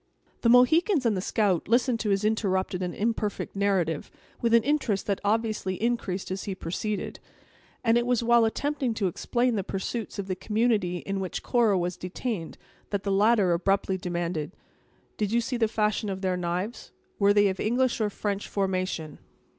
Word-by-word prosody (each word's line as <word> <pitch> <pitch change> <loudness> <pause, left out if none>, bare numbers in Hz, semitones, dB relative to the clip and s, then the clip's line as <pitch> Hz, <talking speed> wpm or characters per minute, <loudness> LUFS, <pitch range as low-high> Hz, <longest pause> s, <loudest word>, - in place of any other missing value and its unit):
The 230 - +3
Mohicans 290 - +5
and 225 -3 +3
the 185 - -1
scout 200 -4 +1
listened 240 +1 +2
to 215 - -1
his 195 +1 +1
interrupted 190 -4 0
and 180 -1 -3
imperfect 215 -2 -2
narrative, 190 -6 0 0.3
with 235 - +1
an 230 -1 +5
interest 270 -9 0
that 200 -2 -1
obviously 215 -2 0
increased 220 -6 -1
as 190 0 -4
he 195 - -3
proceeded; 200 +4 -4 0.6
and 230 +1 +4
it 240 - -2
was 245 -1 +2
while 235 0 +5
attempting 265 +1 -1
to 210 - -1
explain 240 +7 0
the 200 - -1
pursuits 205 +4 -4
of 200 - -3
the 185 -1 -2
community 210 -4 0
in 195 0 -2
which 185 -2 -4
Cora 230 -5 +3
was 175 0 -2
detained, 185 -1 -4 0.3
that 200 -1 -2
the 200 - -1
latter 200 -2 +4
abruptly 190 +2 +1
demanded: 175 -3 -3 0.6
"Did 210 -2 -1
you 235 - +3
see 240 +2 -2
the 225 -2 +2
fashion 215 -1 0
of 190 -1 -4
their 185 -1 0
knives? 180 +6 -3 0.3
were 200 0 +5
they 205 0 +5
of 190 - -4
English 245 +2 +1
or 210 - +2
French 205 0 -3
formation?" 185 -5 -2
205 Hz, 180 wpm, -27 LUFS, 185-230 Hz, 0.6 s, Mohicans